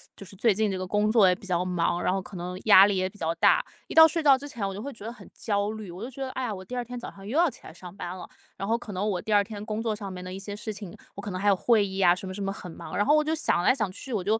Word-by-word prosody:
就 195 - -10
是 195 - -13
最 220 0 +3
近 215 0 0
这 190 - -2
个 185 0 -4
工 210 +2 +1
作 215 -5 +6
也 180 - +4
比 195 - -14
较 180 -2 0
忙， 175 -1 0
然 - - +1
后 195 - -1
可 190 - -12
能 180 +1 -5
压 195 -2 +9
力 205 -1 +1
也 185 0 0
比 205 - -18
较 165 -2 -1
大。 170 - +4 0.2
一 - - -7
到 320 0 +9
睡 325 +1 -2
觉 275 -3 +7
之 285 - -8
前 230 -8 -4
我 195 - -4
就 200 - -6
会 280 - -5
觉 215 - -13
得 230 - -4
很 - - -14
焦 205 -1 -1
虑， 215 -4 -7
我 180 +3 -9
就 250 - -5
觉 270 +1 -10
得 265 - -4
“哎 260 - -4
呀， 225 -4 -2
我 185 - -9
第 220 +7 -7
2 245 - -1
天 245 +1 -8
早 - - -7
上 195 0 -13
又 270 +8 -2
要 345 -2 +5
起 - - -13
来 - - -10
上 175 +2 -11
班 180 -2 -6
了”。 - - -9 0.3
然 195 - -4
后 230 +1 +2
可 215 -4 -9
能 195 +3 -1
我 190 -4 -1
第 215 - -2
2 205 0 +5
天 205 0 -8
工 215 +1 -3
作 220 -2 0
上 200 -2 -7
面 180 -1 -7
的 185 0 -7
一 190 - -6
些 205 +1 -6
事 215 +1 -5
情， 200 -4 -9 0.2
我 200 - -7
可 205 - -6
能 185 - -4
还 205 - -1
有 195 - +5
会 220 +1 +3
议 195 0 -5
啊， 175 -1 +6
什 190 - -8
么 185 - -5
什 205 - -6
么 195 0 -1
很 180 -3 -8
忙， - - -8
然 205 - +2
后 295 - +5
我 305 - +3
就 315 +1 0
想 235 - +1
来 255 - +4
想 215 -7 -1
去 255 +7 -8
我 200 -4 -1
就， 215 +4 +1
205 Hz, 390 characters per minute, -27 LUFS, 185-225 Hz, 0.3 s, 压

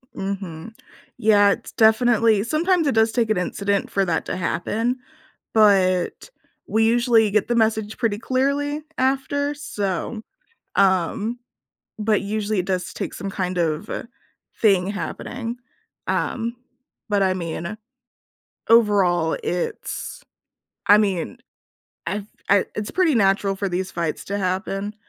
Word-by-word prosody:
Mhm. 195 0 -5 0.4
Yeah, 205 -2 +5
it's - - -4
definitely 220 -1 +4
sometimes 325 - +1
it 275 - +1
does 220 0 +4
take 230 -1 0
an 215 - +2
incident 200 +2 -1
for 195 -1 +1
that 165 -3 -1
to - - -3
happen, 225 +8 -1 0.5
but 195 - +3 0.4
we 220 +1 +2
usually 230 -2 +4
get 210 0 +1
the 240 - +1
message 220 -2 +1
pretty 220 -4 0
clearly 280 +5 0
after, 275 +2 0
so 210 - -3 0.5
um, 195 +5 +1 0.6
but 210 -1 +2
usually, 210 +1 -2
it 180 - -1
does 185 -1 -2
take - - -4
some 195 - -5
kind 185 -2 -3
of, 160 +3 -1
uh, - - -3 0.6
thing 195 -4 +4
happening. 230 +3 -4 0.5
Um, 235 -1 -1 0.5
but 205 -1 +2
I 190 -1 +2
mean, 170 +3 -4 0.9
overall, 195 -7 +4
it's 175 0 -4 0.6
I 205 - +8
mean, 200 +2 0 0.7
I've 205 -1 -2 0.2
I 200 -1 +4
it's 210 -1 -3
pretty 360 -4 +2
natural 195 -2 +2
for 195 0 -2
these 185 +1 -2
fights 170 -2 -3
to 200 - -3
happen, 195 +2 -2
210 Hz, 130 wpm, -22 LUFS, 190-230 Hz, 0.9 s, I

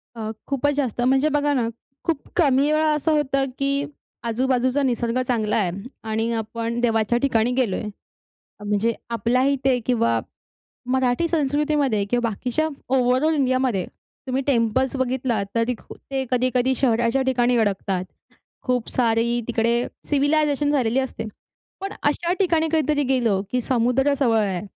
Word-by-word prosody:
अ, 220 -1 -4 0.2
खूपच 285 +1 +1
जास्त. 255 -5 -1
म्हणजे 265 +4 +3
बघा 290 0 +1
ना, 245 -4 +1 0.4
खूप 320 -4 -1
कमी 285 -2 +3
वेळा 310 +1 +2
असं 300 +2 0
होतं 275 -3 +1
की 275 +1 0 0.4
आजू-बाजूचा 255 +3 +1
निसर्ग 240 -1 0
चांगला 220 -4 0
आहे 190 -5 +1 0.4
आणि 225 +1 0
आपण 230 +1 -3
देवाच्या 225 -1 +2
ठिकाणी 240 -3 +2
गेलोय. 235 -8 +1 0.8
म्हणजे 210 +3 +1 0.2
आपल्या 235 +2 +1
इथे 270 -2 +2
किंवा 115 - +2 0.7
मराठी 260 +5 +1
संस्कृतीमध्ये 290 -7 +1
किंवा 240 -1 +1
बाकीच्या 250 +8 -1 0.3
ओव्हरऑल 260 +5 +2
इंडियामध्ये 255 - +1 0.4
तुम्ही 260 +1 -1
टेम्पल्स 260 +1 +1
बघितलात, 250 -5 -1
तरी 230 +2 +1 0.4
ते 270 -1 -1
कधी-कधी 255 +1 +2
शहराच्या 240 0 +1
ठिकाणी 250 -2 +2
अडकतात. 195 -3 0 0.6
खूप 250 -3 -1
सारी 235 0 +1
तिकडे 235 +1 +1 0.2
सिव्हिलायझेशन 290 0 +2
झालेली 255 -4 +1
असते. 265 -3 -4 0.6
पण 390 +1 -4
अशा 335 +4 +1
ठिकाणी 330 -4 +2
कधीतरी 300 -2 +2
गेलं 240 -7 +1
की 250 - +1
समुद्र 250 +3 +1
जवळ 235 -5 +3
आहे, 185 -3 -2
255 Hz, 135 wpm, -23 LUFS, 230-280 Hz, 0.8 s, म्हणजे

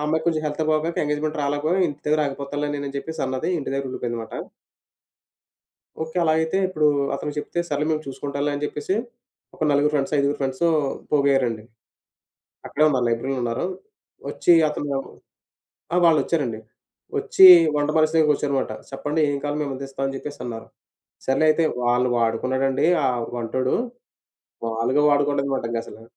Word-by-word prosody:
అమ్మాయికి 160 +1 0
కొంచెం 155 -2 +1
హెల్త్ 150 +2 -2
బాగోక 155 +2 0
ఎంగేజ్‌మెంట్‌కి 150 +1 -2
రాలేకపోయి, 150 +6 0
"ఇంటి 145 0 -8
దగ్గర 155 +1 +2
ఆగిపోతానులే 140 +1 -4
నేను" 140 - -5
అని 140 - -6
చెప్పేసి 160 +3 -6
అన్నది, 130 +4 -2
ఇంటి 140 - -5
దగ్గరుండిపోయిందన్నమాట. 120 -4 -4 1.7
ఓకే, 160 +2 -10
అలా 160 - +3
అయితే 160 +3 0
ఇప్పుడు 155 -5 +1 0.3
అతను 150 - -4
చెప్తే 175 - -3
"సరేలే 150 0 -1
మేము 155 0 -1
చూసుకుంటాంలే" 140 +2 -3
అని 145 - -4
జెప్పేసి, 150 +6 -2 0.6
ఒక - - -22
నలుగురు 145 +1 +3
ఫ్రెండ్సు, 140 0 0
ఐదుగురు 140 +1 +1
ఫ్రెండ్సు 135 +4 0 0.4
పోగయ్యారండి. 135 -6 +2 1.0
అక్కడే 155 - 0
ఉన్నారు, 130 -5 +1
లైబ్రరీలో 120 +4 -1
ఉన్నారు. 120 +7 -2 0.6
ఒచ్చి 175 - +3 0.2
అతను 145 -2 -3 1.0
ఆ! - - +2
వాళ్ళొచ్చారండి. 145 -7 +2 0.6
ఒచ్చి 190 - +5 0.3
వంట 145 0 0
మనిషి 155 0 +3
దగ్గరకొచ్చారు 150 -2 +2
మాట. - - -3 0.2
"సేప్పండి, 145 +3 -2
ఏం 140 - -1
కావాలి? 145 +1 -2
మేమందిస్తాం." 135 -1 -5
అని 135 - -2
జెప్పేసన్నారు. 125 -5 -7 0.6
సర్లే 135 +4 +2
అయితే, 160 +1 +2 0.2
వాళ్ళు 120 +1 +2
వాడుకున్నాడండి! 130 +5 +1 0.2
ఆ - - +4 0.3
వంటోడు! 130 +2 -1 0.9
మామూలుగా 115 +5 0
వాడుకోలేదన్నమాట 140 -3 +1
ఇంగసలు! 115 -1 -6
140 Hz, 140 wpm, -23 LUFS, 130-150 Hz, 1.7 s, ఒచ్చి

